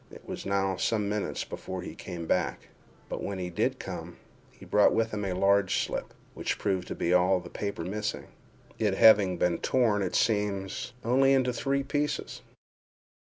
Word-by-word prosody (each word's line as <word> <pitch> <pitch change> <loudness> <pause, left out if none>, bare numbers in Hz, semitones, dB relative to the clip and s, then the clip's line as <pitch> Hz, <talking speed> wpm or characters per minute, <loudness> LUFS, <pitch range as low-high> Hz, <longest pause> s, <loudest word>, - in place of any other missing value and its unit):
It - - -13
was - - -6
now 95 -1 0
some 105 -1 0
minutes 105 0 -2
before 95 -1 -6
he - - -7
came 85 -3 -7
back—but - - -4
when 100 - -3
he 90 -1 -4
did 85 - 0
come, - - -7 0.3
he - - -15
brought 105 - +4
with 115 0 +1
him 105 -1 -2
a 95 -2 -1
large 100 +1 +3
slip, - - -5 0.2
which - - -2
proved 95 -3 -1
to - - -5
be 85 - 0
all 90 +1 +4
the 85 -1 -11
paper 100 -5 -4
missing—it 105 +1 -4
having 100 -4 +6
been 85 0 +1
torn, 115 -5 +2
it 95 - -2
seems, 105 +1 0
only 135 +3 +4
into 130 -2 +2
three 135 +3 0
pieces. 145 +1 -2
100 Hz, 165 wpm, -28 LUFS, 95-110 Hz, 0.3 s, having